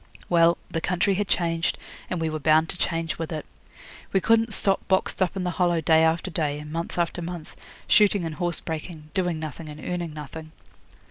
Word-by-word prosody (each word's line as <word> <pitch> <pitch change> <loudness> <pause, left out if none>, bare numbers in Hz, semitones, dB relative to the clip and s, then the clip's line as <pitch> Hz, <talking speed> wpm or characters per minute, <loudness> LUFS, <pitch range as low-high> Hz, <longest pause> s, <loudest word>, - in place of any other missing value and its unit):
Well, 170 0 +5
the 165 - -1
country 180 +3 +1
had 200 +1 -1
changed, 165 -2 0 0.3
and 180 - -2
we 160 - 0
were 155 - -3
bound 155 +2 +4
to - - -3
change 165 -2 -1
with 165 0 -3
it. 155 -2 -4 0.7
We 195 - +3
couldn't 225 +3 +3
stop 195 -1 0
boxed 190 0 +1
up 185 +1 +2
in 190 - -2
the 180 - 0
Hollow 175 -1 +3
day 160 0 +4
after 165 +3 +1
day, 150 -3 +2
and 150 0 -8
month 170 +1 -4
after 175 0 0
month, 170 -2 -7 0.3
shooting 205 -4 +4
and 160 - -3
horse 175 +2 -1
breaking, 155 -1 -6
doing 180 -4 0
nothing 155 0 -6
and 150 0 -9
earning 175 0 -3
nothing. 155 +1 -8
165 Hz, 200 wpm, -25 LUFS, 160-180 Hz, 0.7 s, Well